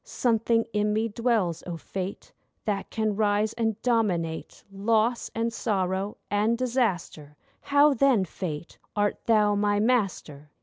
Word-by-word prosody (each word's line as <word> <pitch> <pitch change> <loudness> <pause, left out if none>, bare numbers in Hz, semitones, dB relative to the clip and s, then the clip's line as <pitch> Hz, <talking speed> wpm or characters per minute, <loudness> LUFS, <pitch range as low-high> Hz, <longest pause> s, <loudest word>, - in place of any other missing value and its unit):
Something 230 -1 +1
in 210 0 +1
me 220 +2 0
dwells, 215 -7 0
O 170 -2 -4
Fate, 190 +3 -6 0.3
That 200 -2 -2
can 215 -2 -1
rise 210 +1 +1
and 225 -2 -1
dominate 185 -10 -1
Loss, 220 +4 +1
and 230 0 -1
sorrow, 195 -2 -1
and 215 +3 +2
disaster,— 200 - -2 0.2
How, 285 +1 +4
then, 260 -6 +3
Fate, 165 -2 -6 0.2
art 205 0 0
thou 210 -2 +4
my 205 0 +1
master? 195 - -1
210 Hz, 130 wpm, -26 LUFS, 190-230 Hz, 0.3 s, How